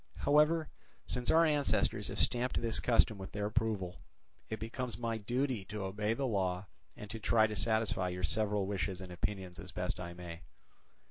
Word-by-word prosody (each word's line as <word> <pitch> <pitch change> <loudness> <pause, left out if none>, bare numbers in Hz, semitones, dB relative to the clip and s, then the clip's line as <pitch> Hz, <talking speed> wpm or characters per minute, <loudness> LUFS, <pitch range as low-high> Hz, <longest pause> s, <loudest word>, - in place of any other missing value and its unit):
However, 150 +2 +4 0.4
since 125 -1 -1
our 165 +1 +6
ancestors 150 -3 +2
have - - -5
stamped 125 +1 +2
this 115 -1 -1
custom 115 -3 +3
with 95 - -8
their 105 0 -1
approval, 105 -4 -1 0.5
it 110 - -3
becomes 115 +2 -4
my 115 -1 -2
duty 125 0 -1
to 105 0 -5
obey 105 +3 -1
the 135 - -1
law 95 -5 0 0.3
and 105 - -7
to 115 - -4
try 110 +1 +4
to 105 0 -2
satisfy 110 -4 +1
your 90 0 -4
several 105 +2 +1
wishes 95 -1 -2
and 95 -2 -8
opinions 95 -1 -3
as 95 -2 -8
best 90 -1 -2
I 85 -1 -5
may. 85 -2 -8
105 Hz, 180 wpm, -34 LUFS, 95-115 Hz, 0.5 s, our